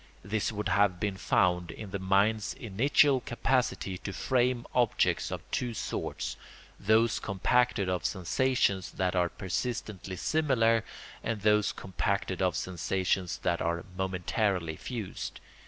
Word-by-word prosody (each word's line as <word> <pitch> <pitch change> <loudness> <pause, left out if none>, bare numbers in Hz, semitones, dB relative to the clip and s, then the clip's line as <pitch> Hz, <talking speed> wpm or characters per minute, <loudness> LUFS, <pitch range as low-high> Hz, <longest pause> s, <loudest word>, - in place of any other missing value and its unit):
This 105 +3 -1
would 105 -1 -3
have 95 -2 +3
been 100 -2 -1
found 90 -2 +2
in 95 +4 -8
the 100 - -3
mind's 100 +3 +2
initial 130 +6 +3
capacity 120 -7 0
to 100 - -5
frame 125 +2 +1
objects 120 -3 +2
of - - -5
two 120 -2 -1
sorts, - - -3 0.4
those 110 +2 +3
compacted 100 +1 +1
of 90 -2 -1
sensations 95 0 +1
that 95 0 0
are 90 -1 +2
persistently 95 -1 -4
similar, 115 - +2 0.4
and 110 -2 -2
those 105 0 +3
compacted 95 0 -2
of 90 -2 +2
sensations 90 0 -1
that 85 - +1
are 85 0 -1
momentarily 95 -2 -1
fused. 110 0 -6
100 Hz, 125 wpm, -30 LUFS, 95-115 Hz, 0.4 s, have